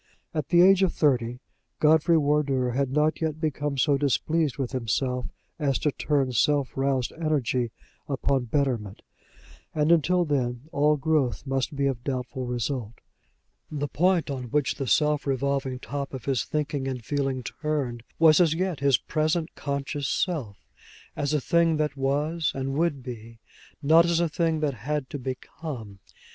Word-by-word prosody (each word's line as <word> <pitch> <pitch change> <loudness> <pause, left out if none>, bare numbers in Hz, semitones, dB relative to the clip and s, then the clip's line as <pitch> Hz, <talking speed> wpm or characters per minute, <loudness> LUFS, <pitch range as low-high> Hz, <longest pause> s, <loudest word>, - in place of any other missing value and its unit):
At 155 -3 -2
the 175 0 +6
age 195 0 +6
of 190 -3 +3
thirty, 125 -4 +1 0.4
Godfrey 160 +2 +4
Wardour 140 -4 +1
had 135 +2 0
not 150 +3 +1
yet 160 -1 -1
become 145 -2 -2
so 140 +2 +3
displeased 145 +3 +1
with 135 -3 -2
himself 125 +1 -1 0.3
as 140 -4 +1
to 150 - 0
turn 140 -2 0
self 140 +3 +1
roused 135 -2 0
energy 135 -7 0 0.4
upon 135 -1 0
betterment; 120 -6 -1 0.7
and 150 +1 +2
until 175 +2 +3
then 125 -5 -1
all 150 +1 +3
growth 140 - 0
must 135 +1 -1
be 140 0 0
of 130 -3 -1
doubtful 130 -1 -3
result. 120 -1 -3 0.7
The 145 -1 -3
point 175 0 +1
on 130 -2 -4
which 145 +3 0
the 135 - -4
swift 150 +2 +2
revolving 135 -1 -1
top 140 +1 -5
of 125 -2 -8
his 135 -3 0
thinking 145 -3 -2
and 125 -4 -4
feeling 135 -2 -1
turned 135 -4 -3 0.2
was 160 +1 +6
as 160 -2 +3
yet 180 -2 -1
his 140 -2 +4
present 155 +1 -1
conscious 140 0 -3
self, 140 - -2 0.5
as 145 0 -1
a 150 - +2
thing 165 +2 +2
that 150 -1 -1
was 145 +4 0
and 135 0 -2
would 150 -3 0
be, 115 -2 -8 0.5
not 160 +4 +6
as 170 -1 +2
a 170 - +2
thing 160 0 0
that 145 -2 +1
had 140 +4 -3
to 145 - -4
become. 130 -4 -7
140 Hz, 160 wpm, -26 LUFS, 130-155 Hz, 0.7 s, the